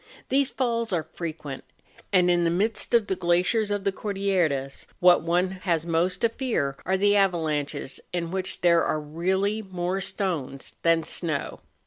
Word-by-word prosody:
These 275 0 +2
falls 235 -3 -1
are 170 -4 0
frequent, 155 -5 -6 0.5
and 180 -2 +4
in 175 0 +3
the 170 - +3
midst 210 +7 0
of 230 -3 +4
the 190 - -1
glaciers 180 +6 +2
of 205 -1 -1
the 200 - +1
Cordilleras 190 -10 -1
what 180 0 +6
one 175 +2 +1
has 175 -4 -1
most 170 +2 0
to 230 - +4
fear 225 - -1
are 190 +1 +2
the 205 +1 +3
avalanches 155 -8 0
in 170 -2 -3
which 190 0 -3
there 170 -1 +5
are 155 - 0
really 190 +8 -1
more 185 -1 -3
stones 160 -11 -3
than 165 -1 +3
snow. 155 -2 -3
180 Hz, 160 wpm, -26 LUFS, 165-200 Hz, 0.5 s, what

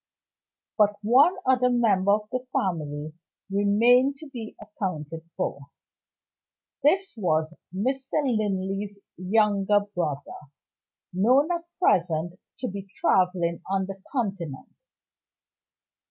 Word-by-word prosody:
But 210 -1 +4
one 270 - +5
other 255 -1 +3
member 205 -5 +3
of 210 0 -1
the 255 0 -2
family 155 - -2 0.4
remained 235 +7 +4
to 310 0 -11
be 235 -5 -8
accounted 165 -6 -5
for. 140 -6 -3 1.1
This 380 +7 +2
was 160 -6 0 0.2
Mr. 260 +8 -2
Linley's 205 -4 -1 0.2
younger 205 +1 +2
brother, 150 -3 -4 0.7
known 255 - +3
at 340 -1 -2
present 175 - +1 0.2
to 255 - -1
be 195 0 -6
traveling 180 -2 +2
on 195 0 0
the 195 0 -8
Continent. 195 - -4
200 Hz, 100 wpm, -26 LUFS, 180-245 Hz, 1.1 s, one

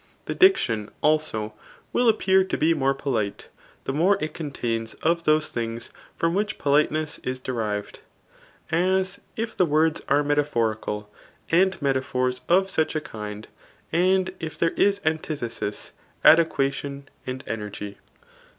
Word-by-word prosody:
The - - -2
diction, 115 - +3
also, 150 -9 +1 0.4
will 245 -1 +4
appear 190 -3 +4
to 190 - -2
be 160 +2 +3
more 135 -3 +1
polite, 115 -8 -2 0.3
the 135 - -3
more 180 +7 +3
it 155 -3 -3
contains 115 -7 -3
of 170 +1 0
those 155 0 +3
things 115 0 -4 0.3
from 165 0 +1
which 205 +2 -1
pibliteness 150 +1 +1
is 130 0 -3
derived 110 -5 -3 0.7
j 165 - +2 0.2
as, 190 +1 -3 0.2
if 225 0 -3
the - - +3
words 155 +1 +2
are 145 +1 +4
metaphorical, 115 -8 -1 0.4
and 185 +3 +3
metaphors 130 -2 0
of 190 +2 +4
such 160 -4 0
a - - +2
kind, 105 -5 -7 0.5
and 185 +2 +2
if 160 -2 -6
there 165 - +2
is 200 0 +2
antithesis,^ 140 -9 -3 0.4
adojuation 140 -3 +3 0.2
and 130 +1 -4
energy. 105 -2 -6
145 Hz, 135 wpm, -25 LUFS, 115-165 Hz, 0.7 s, will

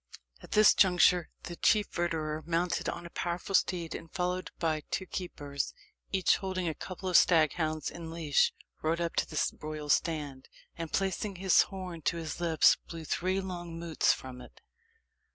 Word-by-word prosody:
At - - -9
this 215 0 +7
juncture 180 -2 +4
the 175 - -6
chief 210 +3 +3
verderer, 160 -3 -2
mounted 170 +1 0
on - - -5
a 170 - -9
powerful 175 +3 -3
steed, 170 -3 +1
and 165 - -8
followed 180 +1 -2
by 160 -2 0
two 190 - -2
keepers, 145 -7 -4 0.4
each 190 -2 +3
holding 185 -2 -3
a 160 - 0
couple 185 +4 -7
of 180 - 0
stag 160 -4 +5
hounds 155 -3 -2
in 170 -1 -8
leash, 160 -3 +2 0.3
rode 160 +2 0
up 170 -1 -2
to - - +2
the 155 - -3 0.2
royal 150 -1 -5
stand, 145 -4 0 0.3
and 165 -1 -6
placing 195 +1 -1
his 190 0 +5
horn 185 -4 -5
to 170 - 0
his 160 -1 -5
lips, 165 -2 +5
blew 165 -1 -7
three 185 +5 0
long 175 -3 -6
mootes 165 -2 +2
from 125 -1 -6
it. - - -15
170 Hz, 170 wpm, -30 LUFS, 155-180 Hz, 0.4 s, this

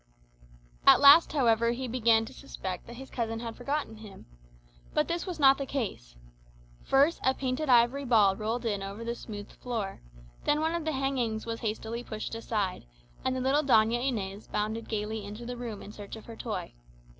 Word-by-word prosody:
At - - +9
last, 285 +4 +8
however, 235 -4 +3
he 255 +1 -4
began 230 -2 +3
to - - -11
suspect 185 -2 -6
that 235 - -9
his 265 +2 -10
cousin 225 -2 -2
had 230 -1 -6
forgotten 275 -3 -3
him. 215 -2 -12 0.7
But 300 - +2
this 340 +2 -2
was 355 -3 -5
not 270 -1 +6
the 275 - -3
case. 195 - -4 0.7
First 280 +5 +3
a 260 0 +3
painted 265 +3 -2
ivory 245 +3 +4
ball 210 -6 +4
rolled 225 +4 -3
in 205 -3 -1
over 200 +3 -6
the 235 0 -2
smooth 205 -3 -8
floor; 225 -6 -5 0.4
then 295 +1 +2
one 320 +1 0
of 340 -2 -2
the 315 - 0
hangings 255 -5 -1
was 230 0 -4
hastily 225 +2 -3
pushed 215 -2 -6
aside, 210 - -2 0.4
and 260 0 0
the 255 - -2
little 270 +3 +3
Doña 240 -3 +3
Inez 205 -6 -3
bounded 215 +2 -3
gaily 215 0 -3
into 210 +4 -8
the 245 +1 -5
room 235 -4 -6
in 205 - -9
search 205 0 -9
of 220 - -11
her 230 - -9
toy. - - -5
235 Hz, 190 wpm, -29 LUFS, 215-265 Hz, 0.7 s, At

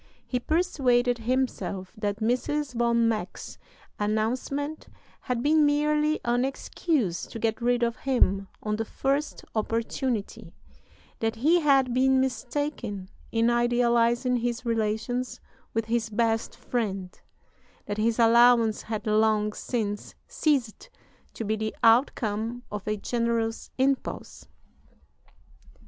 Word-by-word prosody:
He 250 - -1
persuaded 250 -6 +1
himself 230 -6 -2
that 205 -1 -3
Mrs. 255 +5 0
von 235 -1 +2
Meck's 215 -5 -4 0.4
announcement 250 +8 -2 0.3
had 250 -2 -3
been 305 +1 +4
merely 300 +1 +2
"an 240 +1 +2
excuse 270 - -1
to - - -8
get 225 +1 -1
rid 245 0 +2
of 235 0 0
him 200 -7 +1 0.2
on 210 0 -1
the 225 - -1
first 280 +6 -2
opportunity"; 225 -3 -2 0.6
that 225 0 -1
he 310 +10 +3
had 270 -5 +3
been 265 +1 +4
mistaken 245 -5 -3 0.2
in 230 +1 +2
idealizing 240 +1 +2
his 240 0 -2
relations 230 +2 -1 0.4
with 225 -1 0
his 225 0 -1
"best 225 +1 0
friend"; 195 -6 -3 0.6
that 205 - -4
his 225 +1 +1
allowance 235 -1 +5
had 215 -1 -5
long 215 -1 +2
since 210 -4 -3
ceased 280 - -1 0.5
to - - -4
be 215 0 0
the 220 0 -3
outcome 230 -1 +2
of 210 -1 -6
a 215 0 0
generous 230 +1 -1
impulse. 265 +1 -1
235 Hz, 115 wpm, -27 LUFS, 220-255 Hz, 0.6 s, allowance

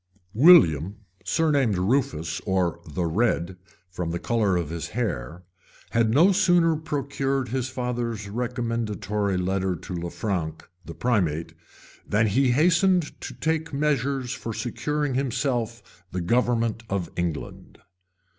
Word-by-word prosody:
} 90 +2 -40
WILLIAM, 90 - +6 0.3
surnamed 145 - +2
Rufus, 90 - 0
or 90 -3 +1
the 80 +3 -2
Red, 90 0 0 0.4
from 90 -1 -3
the 85 - -2
color 105 -2 +1
of 85 -3 -3
his 85 -1 -4
hair, 90 - -3 0.5
had 115 -1 +2
no 160 - +5
sooner 175 -4 +4
procured 140 -4 -2
his 130 +1 -2
father's 120 -4 -3
recommendatory 110 -4 -2
letter 95 0 0
to 90 - -8
Lanfranc, 85 -2 -3 0.2
the 85 0 -9
primate, 85 -9 0 0.6
than 105 +2 +3
he 125 +6 +2
hastened 170 +5 +3
to - - -7
take 160 -1 -1
measures 140 -3 0
for 115 -2 -5
securing 145 +4 -2
to 130 - +1
himself 125 -5 -3
the 90 - -3
government 115 +3 +1
of 95 -4 -2
England. 85 -3 -4
115 Hz, 125 wpm, -25 LUFS, 90-135 Hz, 0.6 s, WILLIAM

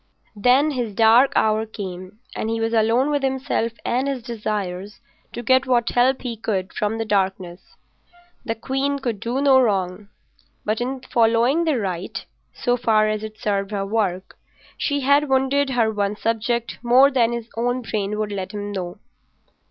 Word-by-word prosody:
Then 255 +8 +3
his 240 -7 -3
dark 230 +5 +5
hour 215 0 +2
came 190 0 -8
and 220 - -2
he 225 0 -1
was 225 0 -1
alone 230 +5 +2
with 290 -1 0
himself 265 -4 -1
and 255 +3 0
his 270 -4 -3
desires 210 -4 -4 0.3
to 240 - -6
get 260 +2 +3
what 240 -2 +2
help 255 +2 +2
he 240 -2 -3
could 195 -4 -3
from 210 +1 -1
the 225 - -2
darkness. 190 -3 -2 0.7
The 225 -3 -2
queen 270 +4 -1
could 240 -6 -3
do 235 +5 -2
no 270 -2 +5
wrong, 195 -3 -1 0.6
but 215 +2 -1
in 260 +1 -3
following 240 +6 +2
the 310 -5 +1
right, 185 -5 -4 0.3
so 245 0 0
far 215 -3 +3
as 215 0 -2
it 215 0 -7
served 200 -2 -1
her 200 -2 -2
work, 195 -3 -2 0.4
she 285 -1 -1
had 280 +2 +3
wounded 270 +1 +2
her 235 -4 +1
one 205 0 -1
subject 230 +2 -2
more 255 +3 +5
than 240 -3 +2
his 235 -1 -4
own 245 +2 -1
brain 210 -2 -2
would 215 -1 -2
let 195 -1 -5
him 205 0 -5
know. 180 -3 -5
225 Hz, 170 wpm, -22 LUFS, 205-255 Hz, 0.7 s, dark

